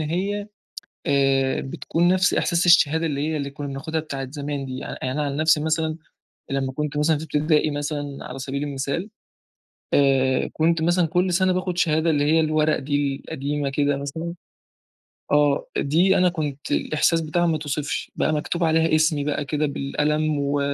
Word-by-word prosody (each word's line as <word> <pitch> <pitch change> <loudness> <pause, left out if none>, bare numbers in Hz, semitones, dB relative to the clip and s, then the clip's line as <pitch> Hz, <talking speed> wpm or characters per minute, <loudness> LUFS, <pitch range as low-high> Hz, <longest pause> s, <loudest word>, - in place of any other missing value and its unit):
هي 195 +6 -2 0.6
آآ 135 -1 +2
بتْكون 165 +5 -1
نفس 185 +1 +3
إحساس 170 0 +1
الشهادة 165 -2 +5
اللي 145 -1 -1
هي 160 - -1
اللي 140 -1 -3
كنا 145 +1 -6
بناخدها 140 +4 -3
بتاعة 140 -3 -5
الزمان 140 +1 -4
دي 130 0 -5
يعني، - - -6 0.2
أنا 150 +3 -1
عن 140 -1 -2
نفسي 155 0 +3
مثلًا، 160 0 0 0.5
لما 135 -1 -1
كُنت 150 +1 -3
مثلًا 150 +1 +2
في 155 - -6
اِبتدائي 155 0 +1
مثلًا 145 -1 -4
على 125 - -7
سَبيل 135 +1 -4
المثال، 145 +7 -3 0.8
آآ 135 -2 +3
كُنت 165 +1 +1
مثلًا 175 +2 +3
كُل 180 +3 +1
سَنَة 185 +1 +3
باخد 180 -1 -2
شهادة 160 -1 +2
اللي 145 -2 +2
هي 160 +2 +4
الورق 155 -1 +2
دي 145 0 -1
القديمة 145 -1 -2
كده 145 0 +1
مثلًا، 160 +5 -5 1.0
آه، 145 -1 +3
دي 175 +7 +3
أنا 180 - +4
كُنت 150 -5 -4
الإحساس 165 +2 +1
بتاعها 165 +2 0
ما 165 - +2
يتْوِصفش 150 -1 -3
بقى، - - +1
مكتوب 160 +3 -1
عليها 160 0 +3
اسْمي 155 -2 +2
بقى 145 0 -1
كده 150 +1 -1
بالقلم، 150 +2 -1
و 140 0 0
150 Hz, 170 wpm, -23 LUFS, 140-160 Hz, 1.0 s, الشهادة